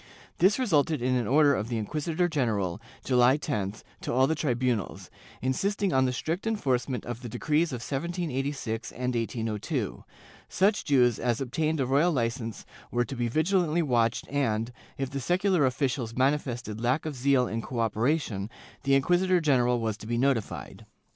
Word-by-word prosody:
* - - -25
This 190 +5 +5
resulted 160 - +2
in 125 +1 0
an 120 -4 0
order 145 +2 +5
of 110 -5 -2
the 120 - -1
inquisitor 155 - -1
general, 110 - -1 0.2
July 125 +1 +4
10th, 105 -9 -3 0.2
to - - -3
all 130 +2 +4
the 155 - +1
tribunals, 125 - -1 0.3
insisting 195 +9 0
on 130 0 +4
the 125 - +1
strict 165 - -3
enforcement 130 - -1
of 120 0 -5
the 120 - -6
decrees 155 +7 0
of 125 -3 -4
1786 135 -6 -3
and 125 0 -2
1802; 115 -2 -2 0.5
such 200 +2 +2
Jews 125 -5 +3
as 120 -1 0
obtained 155 +4 -1
a 135 - +2
royal 145 +7 +3
licence 115 -4 -2 0.2
were 120 0 0
to 135 - -6
be 120 -1 -1
vigilantly 165 - +1
watched 120 -5 +1
and, 115 -5 0 0.3
if 135 -1 -3
the 140 - -3
secular 180 0 +2
officials 125 -3 -1
manifested 125 -5 -1
lack 130 +6 +1
of 155 -2 -3
zeal 130 -1 +2
in 115 +1 -3
cooperation, 115 -2 -1 0.3
the 135 -1 +3
inquisitor 180 +6 +3
general 125 -6 +2
was 110 -2 -2
to 110 - -10
be 120 0 -1
notified. 130 -3 -1
130 Hz, 165 wpm, -28 LUFS, 120-155 Hz, 0.5 s, This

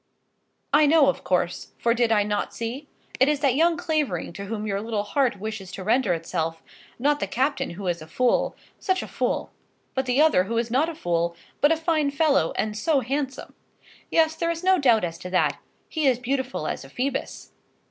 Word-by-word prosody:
I 300 +1 +6
know, 295 -2 +5
of - - -2
course, 180 -1 -1
for 235 - +2
did 235 -1 +1
I 210 -2 +4
not 205 0 -2
see? 245 +6 -5 0.3
It 265 - +5
is 295 -1 0
that 275 -4 +3
young 330 +4 +3
Clavering 300 - -1
to 200 +3 -7
whom 215 +1 -4
your 200 -1 -1
little 220 -2 -2
heart 255 0 0
wishes 210 -3 -6
to 190 - -6
render 215 -3 +2
itself; 165 -1 -3 0.3
not 290 +4 +1
the - - -2
captain 270 +4 0
who 200 - -6
is 175 -2 -1
a 155 - -10
fool, 245 +9 +1 0.2
such 375 -1 0
a - - -7
fool! - - -2 0.4
but 265 0 -1
the 250 +2 +2
other 300 -13 +5
who 230 +3 -2
is 230 0 -1
not 285 +7 +2
a 335 - -6
fool, 170 - -1 0.2
but 290 - +4
a 325 - +3
fine 315 -3 +1
fellow; 280 - +2
and 215 -1 -1
so 275 +6 +1
handsome! 270 +2 -3 0.6
Yes; 320 -1 +3
there 335 +1 -1
is 335 +1 -3
no 375 0 +4
doubt 235 -7 +4
as 165 -1 -3
to 180 - -7
that. 185 0 +1 0.3
He 310 -3 0
is 255 -3 +4
beautiful 260 +1 -2
as - - -3
a - - -12
Phoebus. 265 +2 -4
250 Hz, 210 wpm, -25 LUFS, 205-295 Hz, 0.6 s, I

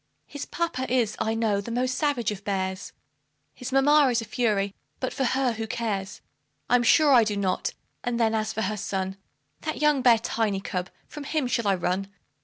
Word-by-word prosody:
His 285 -1 -7
papa 260 -7 -2
is, 240 -4 +2
I 220 +1 0
know, 215 -3 +1
the 200 - -8
most 250 +2 0
savage 275 -8 0
of 200 -1 -7
bears, 190 -1 -2 0.6
His 250 +1 -7
mamma 285 +2 +5
is 240 -1 +2
a 225 - -4
fury; 210 -4 0 0.3
but 260 - -2
for 275 - -1
her 260 0 +1
who 225 -1 -4
cares? 210 -4 -3 0.5
I'm 245 0 +5
sure 285 +4 +5
I 240 -3 +7
do 210 -2 -1
not; 190 -2 -1 0.3
and 240 -1 -1
then, 225 -1 +3
as 215 -1 0
for 220 - -2
her 210 +2 -1
son, 190 -1 -3 0.4
That 310 - -4
young 300 -2 +3
bear, 240 -2 +6
Tiny 220 -3 -1
cub 185 -1 -4 0.2
from 295 - -8
him 300 -1 0
shall 235 -3 0
I 195 - +4
run? 180 +2 -1
230 Hz, 200 wpm, -26 LUFS, 200-255 Hz, 0.6 s, I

